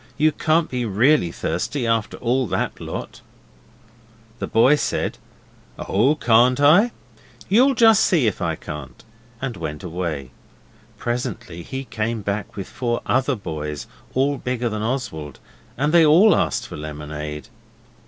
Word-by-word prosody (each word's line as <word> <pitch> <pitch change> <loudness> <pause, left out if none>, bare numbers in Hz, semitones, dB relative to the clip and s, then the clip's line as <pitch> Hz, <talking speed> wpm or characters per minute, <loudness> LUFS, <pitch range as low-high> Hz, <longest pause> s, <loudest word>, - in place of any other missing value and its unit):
You 155 +2 +4
can't 155 +2 +1
be 125 -1 -3
really 115 - +3
thirsty 120 - -2
after 115 -1 0
all 125 +1 0
that - - -2
lot.' - - -6 1.2
The - - -3
boy 115 +6 +5
said, 150 - -2 0.6
'Oh, 125 +10 +2
can't 125 -1 +4
I? 165 +11 +6 0.6
You'll 255 +7 +4
just 225 -2 +6
see 165 - +3
if 105 -2 -1
I 85 -2 0
can't,' 75 -3 -9 0.4
and 130 -4 -3
went 75 -3 -5
away. 80 -7 -4 0.7
Presently 120 -8 -4
he 135 +9 -6
came 115 -3 -3
back 100 0 -3
with 100 - -5
four 120 -2 -2
other 130 +2 +1
boys, 75 -7 -5 0.3
all 135 +2 +1
bigger 125 -1 -2
than 110 -1 -4
Oswald; 110 - -4 0.4
and 145 +5 0
they 170 -1 +7
all 170 +8 +6
asked - - 0
for - - -8
lemonade. 75 0 -6
120 Hz, 140 wpm, -22 LUFS, 85-140 Hz, 1.2 s, they